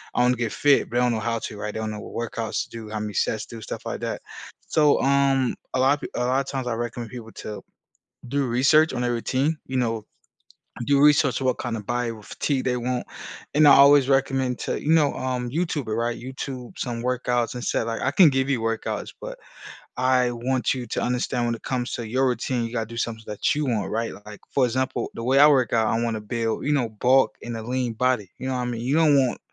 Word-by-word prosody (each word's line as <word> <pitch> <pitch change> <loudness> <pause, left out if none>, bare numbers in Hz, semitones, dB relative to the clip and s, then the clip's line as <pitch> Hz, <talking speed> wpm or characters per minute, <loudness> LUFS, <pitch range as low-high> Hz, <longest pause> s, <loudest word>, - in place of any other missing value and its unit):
I - - +3
wanna 125 0 +3
get 115 -2 -2
fit," 145 -1 +3
but 120 - -7
they - - +3
don't 125 -1 +3
know 115 - -1
how 115 +1 -1
to, 105 - -7
right? 105 0 -3
They - - -4
don't 110 -1 -3
know 105 - -6
what 115 +2 -5
workouts 115 -2 -2
to - - -15
do, 115 -2 -8
how 110 0 -4
many 105 -1 -4
sets 110 +2 0
do, 115 -1 -10
stuff - - -7
like - - -4
that. - - -3 0.5
So, 150 -2 +3
um, 135 -1 +2 0.2
a - - +1
lotta 135 +3 +3
p - - -5
a 125 - 0
lotta 130 +2 0
times, 135 -2 -3
I 120 - 0
recommend 120 -1 -5
people 115 -3 -9
to 105 - -7 0.7
do 140 +1 0
research 140 +6 +4
on 125 - -2
their 120 - 0
routine, 135 +6 0
you 130 - -4
know, 115 -3 -1 0.8
do 140 -1 +3
research 145 -2 +4
on 130 - -1
what 130 - 0
kinda 115 -3 -3
body 120 +2 -2
or 110 -2 -9
physique 135 +5 -2
they 125 -1 +1
want, 125 0 -2 0.5
and 150 +1 +6
I - - +10
always 140 -1 +7
recommend 135 -2 +1
to - - -2
you 155 - +2
know, 150 -3 +4
um, 125 -1 -2
YouTuber, 145 -7 -2
right? 120 0 -1
YouTube 130 -1 -7
some 120 -2 -3
workouts 125 0 0
and 125 - -5
say, - - 0
like, 115 0 -3
"I 130 - +1
can 165 -2 +7
give 135 0 0
you 130 -4 +1
workouts, 115 0 -2
but - - -7 0.6
I 130 -1 +3
want 125 +2 0
you 125 -2 -5
to - - -2
understand 125 0 -1
when 120 - 0
it 115 - -10
comes 125 -2 -2
to 120 -3 -4
your 130 +3 +2
routine, 125 0 -1
you 115 - -5
gotta 115 -2 -2
do 115 +1 -10
something 110 -1 -3
that 105 -1 0
you 150 -1 -1
want." 110 -5 -1
Right? 115 +1 -2
Like, 105 -1 -10
for 135 - +2
example, 125 0 -2
the 115 - -6
way 130 +3 +3
I 145 - +9
work 130 -5 +3
out, 110 -1 +3
I 115 +1 0
wanna 115 -2 -1
build 115 +1 -2
you 150 - +2
know, 125 -5 +1
bulk 125 +5 +2
and 120 -1 -5
a - - -6
lean 125 +1 -2
body, 125 -6 0
you 130 - -4
know 130 - -1
what 125 - -1
mean? 120 -2 -3
You 130 +4 0
don't 155 -3 +5
want 130 -3 +1
125 Hz, 245 wpm, -24 LUFS, 115-135 Hz, 0.8 s, I